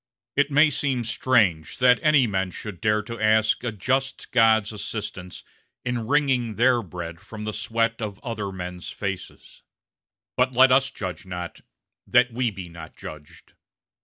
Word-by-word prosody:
It 145 Hz, 0 st, +3 dB
may 150 Hz, +2 st, +5 dB
seem 135 Hz, -3 st, -1 dB
strange 110 Hz, -8 st, +1 dB
that 125 Hz, -1 st, +5 dB
any 150 Hz, -4 st, +5 dB
men 95 Hz, -3 st, -1 dB
should 95 Hz, 0 st, -8 dB
dare 105 Hz, 0 st, +2 dB
to 115 Hz, +2 st, -7 dB
ask 110 Hz, +1 st, +3 dB
a 120 Hz, -, -1 dB
just 135 Hz, +6 st, -2 dB
God's 110 Hz, -3 st, +4 dB
assistance 100 Hz, -3 st, -6 dB, 0.4 s
in 120 Hz, -3 st, -2 dB
wringing 130 Hz, -6 st, +1 dB
their 120 Hz, +1 st, +4 dB
bread 85 Hz, -4 st, -7 dB
from 105 Hz, +3 st, -9 dB
the 110 Hz, 0 st, -3 dB
sweat 115 Hz, +1 st, -1 dB
of 105 Hz, -3 st, -4 dB
other 105 Hz, -5 st, -4 dB
men's 90 Hz, -1 st, -6 dB
faces; 100 Hz, -3 st, -6 dB, 0.7 s
but 130 Hz, +1 st, +2 dB
let 130 Hz, +1 st, +6 dB
us 135 Hz, +1 st, +4 dB
judge 95 Hz, -7 st, -6 dB
not, 90 Hz, -1 st, -6 dB, 0.5 s
that 125 Hz, -1 st, +4 dB
we 125 Hz, 0 st, +1 dB
be 95 Hz, -4 st, -8 dB
not 80 Hz, -2 st, -11 dB
judged. 75 Hz, -1 st, -11 dB
110 Hz, 155 wpm, -24 LUFS, 95-125 Hz, 0.7 s, let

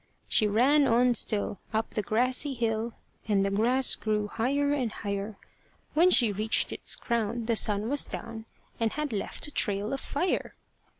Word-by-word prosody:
She 215 Hz, -, +3 dB
ran 270 Hz, +8 st, +3 dB
on 245 Hz, +2 st, +3 dB
still 210 Hz, -4 st, 0 dB, 0.2 s
up 220 Hz, 0 st, -1 dB
the 215 Hz, -, -2 dB
grassy 250 Hz, +6 st, 0 dB
hill, 230 Hz, -1 st, -2 dB, 0.3 s
And 200 Hz, -2 st, +2 dB
the 195 Hz, -, -1 dB
grass 240 Hz, +6 st, +3 dB
grew 210 Hz, -1 st, -1 dB
higher 280 Hz, +6 st, 0 dB
and 255 Hz, -6 st, -1 dB
higher; 200 Hz, 0 st, -5 dB, 0.6 s
When 335 Hz, +4 st, +5 dB
she 240 Hz, -, +4 dB
reached 215 Hz, +3 st, +1 dB
its -, -, +1 dB
crown, 235 Hz, 0 st, -2 dB
the 230 Hz, 0 st, +1 dB
sun 210 Hz, 0 st, +2 dB
was 285 Hz, +3 st, 0 dB
down, 225 Hz, -1 st, -5 dB, 0.3 s
And 225 Hz, -1 st, 0 dB
had 300 Hz, -4 st, -3 dB
left 200 Hz, -, -3 dB
a -, -, -10 dB
trail 205 Hz, -2 st, -1 dB
of 270 Hz, -, -3 dB
fire. 355 Hz, +6 st, -2 dB
230 Hz, 170 wpm, -28 LUFS, 210-255 Hz, 0.6 s, When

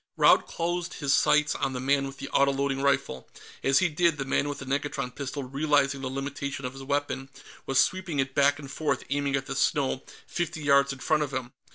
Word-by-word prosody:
Raud -, -, +5 dB
closed 175 Hz, +1 st, -3 dB
his 140 Hz, -2 st, 0 dB
sights 150 Hz, +1 st, +4 dB
on 135 Hz, -, -2 dB
the 125 Hz, -, -3 dB
man 135 Hz, +1 st, +1 dB
with 135 Hz, 0 st, -9 dB
the 135 Hz, +1 st, -6 dB
autoloading 140 Hz, 0 st, +2 dB
rifle; 135 Hz, -, 0 dB, 0.3 s
as 135 Hz, 0 st, +4 dB
he 190 Hz, -, +4 dB
did, 165 Hz, 0 st, +1 dB
the 135 Hz, -, -3 dB
man 140 Hz, +2 st, 0 dB
with 145 Hz, -, -4 dB
the 140 Hz, -, -8 dB
negatron 135 Hz, -1 st, -2 dB
pistol, 140 Hz, 0 st, -4 dB
realizing 140 Hz, 0 st, +1 dB
the 130 Hz, -, -3 dB
limitations 140 Hz, 0 st, -4 dB
of 125 Hz, -, -4 dB
his 135 Hz, -, -10 dB
weapon, 140 Hz, -1 st, -2 dB, 0.4 s
was 135 Hz, -1 st, +2 dB
sweeping 185 Hz, -1 st, +1 dB
it 135 Hz, -1 st, 0 dB
back 140 Hz, +1 st, +4 dB
and 140 Hz, -2 st, -9 dB
forth, 145 Hz, -4 st, -1 dB
aiming 140 Hz, -1 st, 0 dB
at 135 Hz, -1 st, -2 dB
the 135 Hz, -, -5 dB
snow 135 Hz, -1 st, +1 dB, 0.2 s
fifty 165 Hz, -3 st, -3 dB
yards 140 Hz, -1 st, +4 dB
in 135 Hz, -, -6 dB
front 150 Hz, +3 st, +1 dB
of 145 Hz, -2 st, -2 dB
him. 130 Hz, -2 st, -4 dB
140 Hz, 215 wpm, -27 LUFS, 135-145 Hz, 0.4 s, Raud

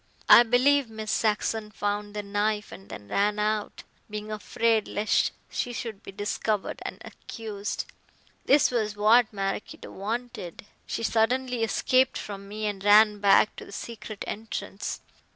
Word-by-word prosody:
I -, -, +10 dB
believe 250 Hz, +2 st, +3 dB
Miss 220 Hz, -1 st, -5 dB
Saxon 215 Hz, 0 st, 0 dB
found 205 Hz, 0 st, -3 dB
the 210 Hz, -, -3 dB
knife 210 Hz, +1 st, -1 dB
and 195 Hz, -, -12 dB
then 100 Hz, -, -9 dB
ran 205 Hz, -, +1 dB
out, 210 Hz, 0 st, -1 dB, 0.3 s
being 210 Hz, 0 st, -6 dB
afraid 220 Hz, +1 st, 0 dB
lest 210 Hz, +1 st, +1 dB, 0.2 s
she 245 Hz, -, -2 dB
should 225 Hz, -4 st, -5 dB
be -, -, -10 dB
discovered 205 Hz, +1 st, -2 dB
and -, -, -6 dB
accused. 210 Hz, -3 st, -6 dB, 0.6 s
This 280 Hz, -1 st, +5 dB
was 215 Hz, -4 st, -1 dB
what 215 Hz, +3 st, +4 dB
Maraquito 195 Hz, 0 st, -4 dB
wanted. 215 Hz, -3 st, -5 dB, 0.2 s
She -, -, -3 dB
suddenly 245 Hz, +2 st, +1 dB
escaped 255 Hz, +3 st, +2 dB
from 200 Hz, -1 st, -7 dB
me 215 Hz, +2 st, -5 dB
and 200 Hz, -2 st, -3 dB
ran 210 Hz, 0 st, +6 dB
back 200 Hz, +1 st, +4 dB
to -, -, -7 dB
the -, -, -13 dB
secret 215 Hz, 0 st, -7 dB
entrance. 215 Hz, -2 st, -5 dB
215 Hz, 145 wpm, -27 LUFS, 205-225 Hz, 0.6 s, I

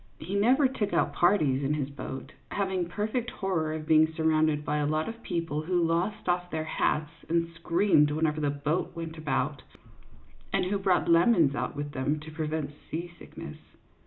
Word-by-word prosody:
He 180 Hz, +5 st, -7 dB
never 250 Hz, +8 st, +4 dB
took 230 Hz, -6 st, -2 dB
out -, -, +2 dB
parties 155 Hz, -8 st, +3 dB
in 145 Hz, +2 st, +1 dB
his 145 Hz, -2 st, -3 dB
boat, 135 Hz, -1 st, -7 dB, 0.2 s
having 190 Hz, -3 st, -1 dB
a -, -, -14 dB
perfect 215 Hz, +5 st, -2 dB
horror 175 Hz, -8 st, -1 dB
of 155 Hz, 0 st, -4 dB
being 160 Hz, 0 st, +5 dB
surrounded 155 Hz, -2 st, +1 dB
by 150 Hz, -, 0 dB
a 145 Hz, -1 st, +1 dB
lot 155 Hz, +1 st, 0 dB
of 230 Hz, 0 st, -7 dB
people 165 Hz, -7 st, -2 dB
who 175 Hz, +3 st, 0 dB
lost 170 Hz, +6 st, 0 dB
off 180 Hz, 0 st, 0 dB
their 160 Hz, -2 st, -2 dB
hats 150 Hz, -1 st, 0 dB, 0.2 s
and 170 Hz, 0 st, +2 dB
screamed 170 Hz, -2 st, +3 dB
whenever 155 Hz, 0 st, 0 dB
the 145 Hz, -, +1 dB
boat 145 Hz, +4 st, -2 dB
went 165 Hz, -1 st, -6 dB
about, 145 Hz, -1 st, -1 dB, 0.9 s
and -, -, +1 dB
who 200 Hz, +2 st, 0 dB
brought 190 Hz, -2 st, +2 dB
lemons 170 Hz, -, +5 dB
out 145 Hz, -, -3 dB
with 145 Hz, 0 st, -4 dB
them 140 Hz, +3 st, -1 dB
to 155 Hz, +1 st, -9 dB
prevent 155 Hz, -2 st, -3 dB, 0.2 s
seasickness. 175 Hz, +2 st, -7 dB
160 Hz, 180 wpm, -28 LUFS, 150-180 Hz, 0.9 s, being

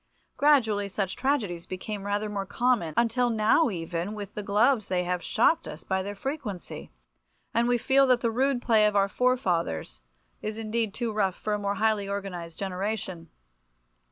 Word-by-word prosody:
Gradually 225 Hz, -9 st, +3 dB
such 195 Hz, -1 st, -2 dB
tragedies 215 Hz, -11 st, -1 dB
became 195 Hz, +2 st, -5 dB
rather 205 Hz, +1 st, 0 dB
more 200 Hz, -2 st, -4 dB
common, 235 Hz, -12 st, +1 dB
until 240 Hz, +1 st, +2 dB
now 225 Hz, +7 st, +3 dB
even 175 Hz, +2 st, -4 dB
with 205 Hz, -1 st, -7 dB
the 210 Hz, -, -4 dB
gloves 215 Hz, +3 st, +2 dB
they 180 Hz, -1 st, 0 dB
have 180 Hz, 0 st, -1 dB
shocked 320 Hz, -, +2 dB
us -, -, -8 dB
by 190 Hz, 0 st, -1 dB
their 200 Hz, +2 st, -5 dB
frequency, 245 Hz, -, -6 dB, 0.6 s
and 235 Hz, +1 st, +2 dB
we 245 Hz, 0 st, +3 dB
feel 270 Hz, +3 st, +4 dB
that 250 Hz, -2 st, +3 dB
the 230 Hz, -, +1 dB
rude 260 Hz, +1 st, +1 dB
play 220 Hz, -3 st, +4 dB
of 210 Hz, -, -1 dB
our 200 Hz, -1 st, +4 dB
forefathers 175 Hz, -, 0 dB, 0.4 s
is 215 Hz, 0 st, -4 dB
indeed 225 Hz, -1 st, -2 dB
too 235 Hz, -2 st, -2 dB
rough 195 Hz, -3 st, +1 dB
for 210 Hz, -, -3 dB
a 210 Hz, -, 0 dB
more 200 Hz, 0 st, -1 dB
highly 210 Hz, -1 st, +1 dB
organized 180 Hz, -5 st, -5 dB
generation. 190 Hz, -3 st, -4 dB
210 Hz, 170 wpm, -27 LUFS, 190-235 Hz, 0.6 s, feel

